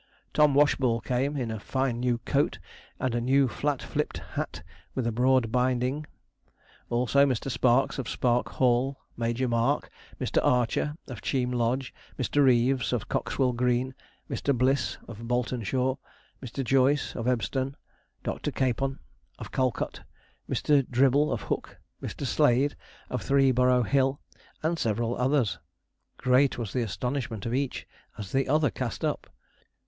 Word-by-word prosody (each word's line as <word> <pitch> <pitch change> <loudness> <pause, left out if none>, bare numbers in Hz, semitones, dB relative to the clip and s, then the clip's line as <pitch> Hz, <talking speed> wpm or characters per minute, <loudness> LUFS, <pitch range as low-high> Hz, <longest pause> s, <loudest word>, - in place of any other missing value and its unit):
Tom 150 -2 +4
Washball 130 -5 +3
came, 135 +4 0
in 120 -4 -2
a 110 - -4
fine 130 +1 -1
new 125 -1 +1
coat - - +1 0.4
and 130 -2 -1
new 135 +2 +4
flat 145 +2 -1
fliped - - -2 0.2
hat - - -4 0.3
with 130 - -1
a 115 - +1
broad 125 0 +2
binding; 130 +4 0 0.8
also 125 +3 +3
Mr. 135 -1 0
Sparks, 125 +3 +2
of 125 - -3
Spark 120 -1 +1
Hall; 130 +2 +1 0.2
Major 120 +2 -1
Mark; 115 -1 +1 0.3
Mr. - - 0
Archer, 125 +4 +1
of 120 -7 -7
Cheam 125 +1 0
Lodge; 125 +2 0 0.2
Mr. 135 +3 +2
Reeves, 130 0 +3
of 120 -3 -2
Coxwell 130 -2 0
Green; 125 +1 +1 0.3
Mr. 140 -3 -1
Bliss, 130 +2 +1
of 115 -3 -9
Boltonshaw; 125 +2 0 0.4
Mr. 135 +1 -4
Joyce, 135 +2 +2
of 115 0 -3
Ebstone; 130 +2 0 0.5
Dr. - - -2
Capon, 135 +1 0 0.4
of - - -8
Calcot; 130 -3 -1 0.5
Mr. 145 -2 +3
Dribble, 135 +4 +3
of - - -2
Hook; - - -4 0.2
Mr. - - -5
Slade, 135 +4 +3 0.4
of 125 - -2
Three 135 -1 +4
Burrow 125 0 +3
Hill; 135 +3 +1 0.4
and 165 +1 0
several 115 +2 0
others. 125 -4 +1 0.6
Great 130 +2 +3
was 115 -5 -4
the 125 - +1
astonishment 115 0 -3
of 115 - -2
each 135 0 -2 0.3
as 100 -4 -7
the 135 0 +1
other 150 -3 +3
cast - - -3
up. - - -2
125 Hz, 145 wpm, -27 LUFS, 120-135 Hz, 0.8 s, Tom